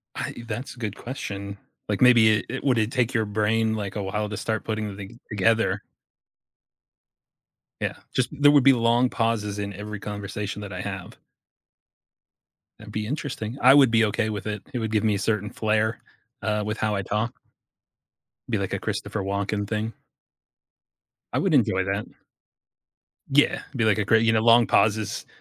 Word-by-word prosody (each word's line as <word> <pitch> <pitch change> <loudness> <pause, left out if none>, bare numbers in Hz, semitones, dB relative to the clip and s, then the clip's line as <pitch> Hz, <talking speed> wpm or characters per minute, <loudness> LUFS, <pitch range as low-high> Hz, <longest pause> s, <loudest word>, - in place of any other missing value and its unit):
I - - -3
eh, - - -8
that's 115 +4 -5
a 125 - -18
good 105 -4 -4
question. 100 -5 -6 0.3
Like, - - -1
maybe 115 -4 +6
it - - -7
it 135 +4 -5
would 125 -4 +3
it 110 +2 0
take 125 -2 0
your 110 - +2
brain, 110 +2 +1
like, 105 -2 -4
a 105 - -2
while 105 +2 -2
to 105 - -5
start 110 +2 -2
putting 110 -3 -3
thing 100 +4 -10
together? 105 -1 +1 2.0
Yeah, - - -1 0.2
just 130 - +1
there 145 -1 +4
would 145 -2 +6
be 135 +1 +7
long 120 +1 +3
pauses 110 -4 -1
in 100 0 -3
every 105 +1 -7
conversation 105 -1 -5
that 100 - -7
I - - -5
have. - - -6 1.6
That'd 105 -1 -11
be 105 0 -3
interesting. 130 -3 -4
I 130 +2 +7
would 135 -4 +7
be 115 -1 +4
okay 110 +1 -1
with 105 0 -5
it. 105 -2 -3
It 125 - -2
would 110 -2 -2
give 110 0 +1
me 110 -1 +3
a - - -1
certain 105 0 -1
flare, 110 +1 0 0.4
uh, 105 0 0
with 110 +1 -3
how 110 -1 0
I 100 - -1
talk 110 +6 -2 1.1
be - - 0
like - - -3
a - - 0
Christopher 105 - -3
Walken 100 +1 -2
thing. 110 +1 -2 1.4
I - - +1
would - - +1
enjoy 95 0 +3
that. 100 +2 -2 1.2
Yeah, 145 +2 +3
be 115 - +1
like 110 0 +3
a 105 - +1
great 110 +2 +4
you 115 - +4
know, 110 - +3
long 115 +1 +6
pauses 110 -1 +1
110 Hz, 180 wpm, -25 LUFS, 105-115 Hz, 2.0 s, be